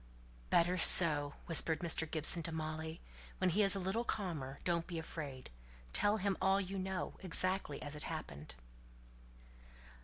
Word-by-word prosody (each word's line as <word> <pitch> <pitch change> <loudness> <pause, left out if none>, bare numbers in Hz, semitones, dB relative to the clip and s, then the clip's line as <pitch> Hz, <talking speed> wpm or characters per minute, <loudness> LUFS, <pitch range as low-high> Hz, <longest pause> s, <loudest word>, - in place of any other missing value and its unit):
"Better 175 +2 +1
so!" 150 -4 +7
whispered 165 0 +3
Mr. 160 -2 +1
Gibson 160 +2 0
to 165 - -6
Molly. 160 0 -6 0.4
"When 185 -1 0
he's 200 +2 +3
a - - -3
little 190 +5 -3
calmer, 160 - -5
don't 170 -1 -2
be 175 -3 -7
afraid; 145 - -8 0.4
tell 205 +1 +2
him 200 -2 -2
all 195 +1 +2
you 195 0 -5
know, 190 0 -5
exactly 185 -3 -1
as 145 0 -6
it 150 - -3
happened." 75 - -8
170 Hz, 145 wpm, -34 LUFS, 155-190 Hz, 0.4 s, so